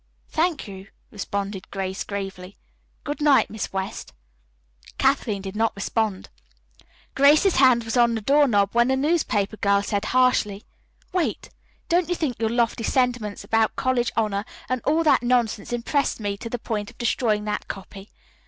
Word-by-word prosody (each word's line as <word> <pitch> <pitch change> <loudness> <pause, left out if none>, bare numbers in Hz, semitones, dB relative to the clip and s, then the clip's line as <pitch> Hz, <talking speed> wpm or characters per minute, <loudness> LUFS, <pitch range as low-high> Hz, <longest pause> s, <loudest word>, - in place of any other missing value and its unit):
"Thank 320 -5 0
you," 195 -1 -10 0.2
responded 200 -1 -4
Grace 190 -1 -4
gravely. 195 -2 -6 0.5
"Good 295 +1 -4
night, 290 -2 +4
Miss 220 -1 -4
West." 190 - -5 0.8
Kathleen 245 -7 +1
did 195 0 -6
not 225 +1 0
respond. 205 0 -2 0.8
Grace's 300 +7 +5
hand 255 -3 +5
was 225 +1 -4
on 235 -1 +4
the 220 - -3
doorknob 240 -6 +3
when 235 +1 +4
the 265 - +2
newspaper 265 -8 0
girl 200 0 +2
said 205 0 -2
harshly: 250 -5 +2 0.5
"Wait. 360 -3 -2 0.4
Don't 350 0 +2
think 320 -8 -2
your 225 -1 +1
lofty 235 0 0
sentiments 245 -5 0
about 225 -1 +1
college 255 -2 0
honor 210 -3 0 0.2
and 255 -1 -1
all 315 +3 +2
that 305 - +4
nonsense 240 -3 0
impressed 240 +4 -1
me 205 -2 -2
to 230 +3 -7
the 245 - -3
point 215 -3 -4
of - - -17
destroying 215 -2 0
that 210 - -3
copy. 195 +1 -9
225 Hz, 155 wpm, -24 LUFS, 200-260 Hz, 0.8 s, Grace's